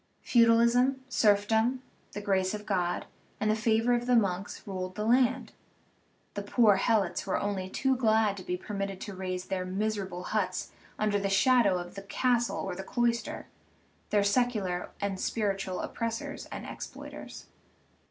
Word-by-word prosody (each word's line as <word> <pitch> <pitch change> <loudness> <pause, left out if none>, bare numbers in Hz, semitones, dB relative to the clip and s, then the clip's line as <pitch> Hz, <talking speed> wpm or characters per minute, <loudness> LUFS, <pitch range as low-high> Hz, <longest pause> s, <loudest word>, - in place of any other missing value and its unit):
Feudalism, 235 +3 +4
serfdom, 220 +3 +2 0.3
the 205 - -5
grace 190 -1 +1
of 210 0 -8
God, 180 -4 -1 0.3
and 215 0 +2
the - - +2
favor 225 +2 +2
of 240 0 0
the 250 - +4
monks 195 -4 0
ruled 185 -2 -5
the 210 - -2
land; 255 +2 +2 0.8
the 205 - -3
poor 205 0 +4
helots 200 -4 +1
were 190 - +1
only 195 -2 -2
too 265 +6 +1
glad 220 -4 +3
to 185 - -7
be 180 0 -2
permitted 195 0 -4
to 205 - -6
raise 185 -1 -4
their 190 -1 -2
mis 210 +4 -1
erable 185 -2 -5
huts 185 -4 -2 0.3
under 210 -1 +1
the 200 0 -1
shadow 200 -1 +4
of 175 0 -6
the 195 - -7
castle 240 +4 0
or 190 - -3
the 190 - -5
clois 235 +2 +1
ter, - - -7 0.6
their 205 -1 +3
secular 200 -4 0
and 200 -2 -2
spiritual 195 -4 -1
oppressors 230 0 -4
and - - -7
exploit - - -8
ers. - - -9
205 Hz, 160 wpm, -29 LUFS, 190-230 Hz, 0.8 s, Feudalism